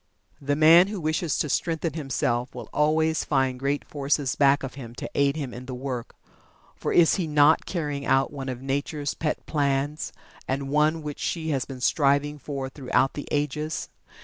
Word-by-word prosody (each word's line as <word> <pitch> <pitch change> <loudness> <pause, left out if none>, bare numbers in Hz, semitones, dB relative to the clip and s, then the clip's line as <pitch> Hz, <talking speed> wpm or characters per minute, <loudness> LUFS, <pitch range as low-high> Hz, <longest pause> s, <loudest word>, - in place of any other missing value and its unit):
The 145 +1 0
man 165 +4 +7
who 205 -1 -4
wishes 155 -1 0
to - - 0
strengthen 165 +1 -1
himself 130 -5 -1
will - - -8
always 160 +1 +2
find 130 -3 0
great 140 +2 -1
forces 140 -2 -1
back 140 0 +4
of 135 - -5
him 120 -4 -9
to - - -5
aid 140 0 +2
him 140 -6 -4
in 125 +2 -9
the 130 - -5
work, 125 -2 -5 0.6
for - - -3
is 170 -2 +5
he 180 -4 -1
not 150 +1 +4
carrying 150 -6 -3
out 135 +1 +2
one 135 -2 -5
of 125 0 -6
Nature's 140 +1 -2
pet 155 -1 -3
plans, 145 0 -1 0.4
and 135 +1 -2
one 150 +2 +2
which 150 -1 -6
she 160 -2 -2
has 135 -4 0
been 130 -2 -9
striving 145 +2 +2
for 135 -2 -4
throughout 135 -1 0
the 145 - -6
ages. 150 +2 -2
145 Hz, 180 wpm, -25 LUFS, 135-155 Hz, 0.6 s, man